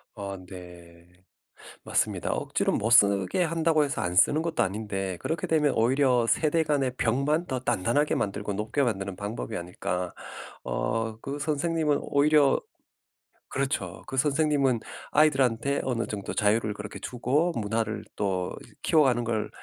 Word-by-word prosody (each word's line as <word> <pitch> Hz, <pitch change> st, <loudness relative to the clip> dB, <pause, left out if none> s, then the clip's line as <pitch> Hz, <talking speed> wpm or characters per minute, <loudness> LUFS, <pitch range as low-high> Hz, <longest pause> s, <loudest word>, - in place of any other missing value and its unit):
어 100 Hz, -2 st, -5 dB
네. 85 Hz, -2 st, -12 dB, 0.8 s
맞습니다. -, -, 0 dB
억지로 -, -, 0 dB
못 110 Hz, -, 0 dB
쓰게 100 Hz, -, +4 dB
한다고 165 Hz, -2 st, +2 dB
해서 140 Hz, -, -3 dB
안 90 Hz, 0 st, -2 dB
쓰는 145 Hz, -, +4 dB
것도 170 Hz, 0 st, 0 dB
아닌데 95 Hz, -2 st, -3 dB
그렇게 165 Hz, -, -3 dB
되면 150 Hz, -3 st, +3 dB
'오히려 125 Hz, 0 st, +3 dB
세대 160 Hz, +4 st, +2 dB
간의 140 Hz, -4 st, 0 dB
벽만 140 Hz, +9 st, +1 dB
더 130 Hz, -5 st, -2 dB
단단하게 125 Hz, +4 st, +1 dB
만들고 100 Hz, +1 st, -2 dB
높게 110 Hz, +8 st, -1 dB
만드는 100 Hz, -6 st, -2 dB
방법이 105 Hz, +2 st, -5 dB
아닐까.' 90 Hz, 0 st, -4 dB, 0.5 s
어 110 Hz, 0 st, -2 dB
그 140 Hz, +4 st, -5 dB
선생님은 155 Hz, 0 st, 0 dB
오히려 145 Hz, -1 st, +3 dB, 0.9 s
그렇죠. 130 Hz, -, -2 dB
그 135 Hz, -, -5 dB
선생님은 140 Hz, -3 st, +2 dB, 0.3 s
아이들한테 140 Hz, -3 st, +3 dB
어느 120 Hz, -3 st, -1 dB
정도 100 Hz, -2 st, -5 dB
자유를 105 Hz, +1 st, +1 dB
그렇게 105 Hz, 0 st, -8 dB
주고 140 Hz, +8 st, 0 dB
문화를 110 Hz, 0 st, -2 dB
또 95 Hz, -3 st, -1 dB, 0.3 s
키워가는 130 Hz, -6 st, +3 dB
걸 110 Hz, -2 st, -2 dB
120 Hz, 310 characters per minute, -27 LUFS, 100-145 Hz, 0.9 s, 쓰게